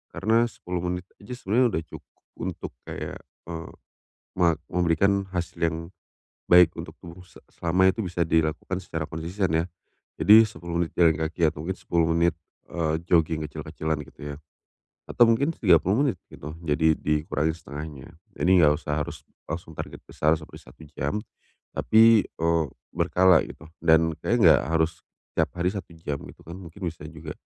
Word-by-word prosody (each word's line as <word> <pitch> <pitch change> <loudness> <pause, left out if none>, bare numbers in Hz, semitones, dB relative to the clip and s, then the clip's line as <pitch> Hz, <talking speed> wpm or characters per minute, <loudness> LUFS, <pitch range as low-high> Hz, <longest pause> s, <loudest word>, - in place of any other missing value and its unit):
karena 115 +4 +2
10 90 -5 -5
menit 90 0 -4 0.2
aja 100 +5 -8
sebenernya 120 +3 +2
udah 80 - 0
cukup - - -12 0.3
untuk - - -5 0.2
kayak, - - -6 0.3
eee, 80 -1 -7 0.7
ma 85 -2 +4 0.2
memberikan 95 +3 +2
hasil 85 -1 -4
yang 80 -1 +1 0.7
baik 90 -1 +7
untuk 85 +1 -7
tubuh 85 0 -11
se - - -18
selama 90 +3 +2
itu 95 - -1
bisa 90 -1 -3
dilakukan 80 +3 0
secara 80 -4 -4
konsisten 90 +5 -2
ya. 80 +1 +2 0.6
Jadi 110 +2 +8
10 85 -5 -4
menit - - -11
jalan 85 -2 +5
kaki 80 +2 -4
atau 75 -1 -9
mungkin 95 - -1
10 85 -1 0
menit, 85 0 +3 0.4
eee, 80 -2 -1
jogging 80 -2 +3
kecil-kecilan 80 +1 -4
gitu - - -19
ya, - - -7 0.8
atau - - +2
mungkin 115 +7 +2
30 95 - +3
menit 130 - 0
gitu 75 +2 -9
jadi 80 0 +2
dikurangi 75 +1 0
1/2-nya. 75 -3 -9 0.2
Jadi, 90 - 0
nggak 75 -1 +6
usah 75 +1 -2
harus - - -9 0.2
langsung 80 0 -6
target - - -7
besar 75 +1 +1
seperti 75 - -12
1 - - -17
jam 70 - -2 0.6
tapi, 115 0 +6
eee, 85 0 0 0.3
berkala 90 -2 +4
gitu, 80 - -12 0.2
dan 80 0 +4
kayaknya 90 - +5
gak - - -3 0.2
harus 80 +1 -1 0.3
tiap - - +2
hari 85 - 0
1 100 -4 -7
jam 75 -3 -4
gitu - - -18
kan, 85 - -8
mungkin 90 -1 -12
bisa 80 -2 -5
juga 80 -1 -8
85 Hz, 160 wpm, -25 LUFS, 80-90 Hz, 0.8 s, Jadi